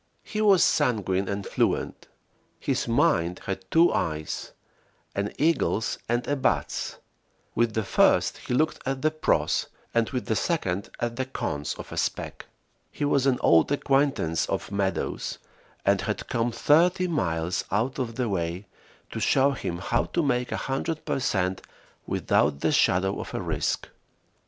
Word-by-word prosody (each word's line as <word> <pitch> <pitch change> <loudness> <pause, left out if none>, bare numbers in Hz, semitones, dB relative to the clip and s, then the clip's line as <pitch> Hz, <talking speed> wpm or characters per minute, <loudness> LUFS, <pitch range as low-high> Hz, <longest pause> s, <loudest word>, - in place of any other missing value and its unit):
He 215 - -3
was 200 -5 +6
sanguine 100 -5 +1
and 100 0 -3
fluent. - - -1 0.5
His - - -1
mind 85 +2 +2
had 95 -1 -5
two 165 +2 +5
eyes, 80 -2 -2 0.6
an 100 +1 -2
eagle's 150 -7 +1
and 120 +1 0
a 145 - +1
bat's; 135 - -1 0.6
with 115 -2 +1
the 110 - +1
first - - +3
he 125 - -2
looked 155 +4 +1
at 135 +1 -3
the 155 - +3
"pros," 155 0 +1 0.3
and 115 -1 +2
with 125 -3 -3
the 110 - 0
second 100 - -1
at 120 0 -2
the 130 - -1
"cons" 75 - -3
of - - -9
a - - -6
spec. - - -3 0.4
He 145 - -2
was 140 -2 +2
an 130 -2 +3
old 80 - +5
acquaintance 135 - +1
of - - -3
Meadows, 100 -1 -2 0.5
and - - +3
had - - -3
come 115 +1 0
thirty 175 +9 +3
miles 85 - -1
out 115 +8 0
of 115 -3 -3
the 125 -1 -1
way 90 -1 -2 0.5
to - - -4
show 135 +1 +3
him 90 -9 -4
how 120 +6 0
to 170 - -1
make 125 -3 0
100 150 +4 -3
per - - -1
cent 95 -6 0 0.5
without 70 -1 +1
the - - +2
shadow 95 +2 +2
of - - -6
a - - -1
risk. - - -1
120 Hz, 155 wpm, -26 LUFS, 95-140 Hz, 0.6 s, was